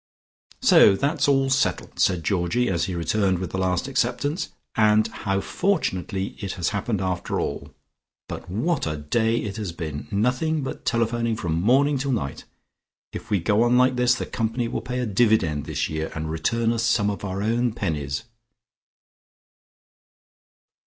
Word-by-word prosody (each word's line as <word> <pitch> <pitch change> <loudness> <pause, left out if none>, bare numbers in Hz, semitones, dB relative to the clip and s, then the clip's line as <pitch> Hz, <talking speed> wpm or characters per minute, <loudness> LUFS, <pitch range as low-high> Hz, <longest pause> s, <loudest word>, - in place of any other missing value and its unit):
"So 100 - +7
that's 145 +10 0
all 135 -1 +3
settled," 135 +2 0
said 90 -3 +2
Georgie, 100 +7 +1
as 85 -3 0
he 90 -1 -4
returned 95 +3 +1
with 90 -2 -5
the 95 - -2
last 95 +5 0
acceptance, 140 +5 -1 0.2
"and 110 0 +4
how 100 -3 -2
fortunately 100 - -1
it 100 -2 -4
has 85 -2 -1
happened 100 0 -2
after 90 -2 -2
all. - - -4 0.6
But - - -7
what 130 - 0
a 75 0 -2
day 110 +10 +1
it 105 -2 -4
has 105 -5 -3
been. 80 -3 -6
Nothing 125 +9 0
but 130 - -6
telephoning 115 0 0
from 85 -5 -2
morning 135 +6 +3
till 135 0 -1
night. 70 - -3 0.7
If - - -7
we 105 -3 +2
go 105 +5 +2
on 120 +1 +4
like 125 0 +4
this 125 0 +3
the - - -4
company 115 +1 -2
will 115 - -3
pay 125 +2 -4
a - - -1
dividend 100 -9 +2
this - - -1
year, 80 +1 -3
and 80 0 -3
return 115 +9 0
us 115 - -1
some 115 -3 +2
of 100 - -7
our 95 0 -3
own 120 +2 +1
pennies." 75 -9 -3
110 Hz, 165 wpm, -24 LUFS, 90-125 Hz, 0.7 s, So